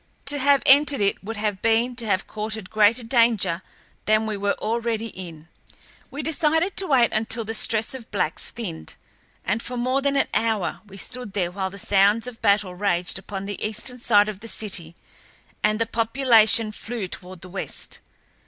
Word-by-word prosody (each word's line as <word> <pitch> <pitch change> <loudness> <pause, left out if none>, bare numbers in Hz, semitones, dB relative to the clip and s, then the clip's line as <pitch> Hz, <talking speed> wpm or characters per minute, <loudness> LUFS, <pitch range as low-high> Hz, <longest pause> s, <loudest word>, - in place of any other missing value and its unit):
To 285 +1 0
have 280 0 +4
entered 285 0 +5
it 200 -1 0
would 220 +2 -5
have 210 -2 -2
been 230 +2 +2
to 235 -3 -3
have 190 -2 +1
courted 215 -2 -5
greater 215 +3 +4
danger 225 -7 +2 0.4
than 215 +1 +3
we 215 -1 -2
were 200 0 0
already 230 0 -2
in. 165 -5 -9 0.6
We 290 - -5
decided 320 +3 +1
to 385 - 0
wait 250 -5 +3
until 225 +1 0
the 220 - -4
stress 225 +1 +2
of 250 -4 -9
blacks 185 -5 -1
thinned, 175 - -7 0.5
and 210 +5 0
for 250 +1 -5
more 255 +3 +1
than 280 0 +1
an 275 - +2
hour 220 -4 0
we 195 -1 -12
stood 220 +2 -4
there 180 -4 -1
while 190 0 -3
the 200 - -11
sounds 200 +3 +3
of 250 -2 -9
battle 200 -2 +2
raged 180 -1 -1
upon 195 0 -6
the 200 -1 -5
eastern 230 +4 -3
side 210 -3 +4
of 210 -3 -5
the 230 - -9
city 185 -7 -5 0.7
and 215 - +2
the 230 - +2
population 230 -1 +3
flew 220 -1 -5
toward 180 -1 -10
the 185 - -10
west. 190 - -4
220 Hz, 180 wpm, -24 LUFS, 200-240 Hz, 0.7 s, entered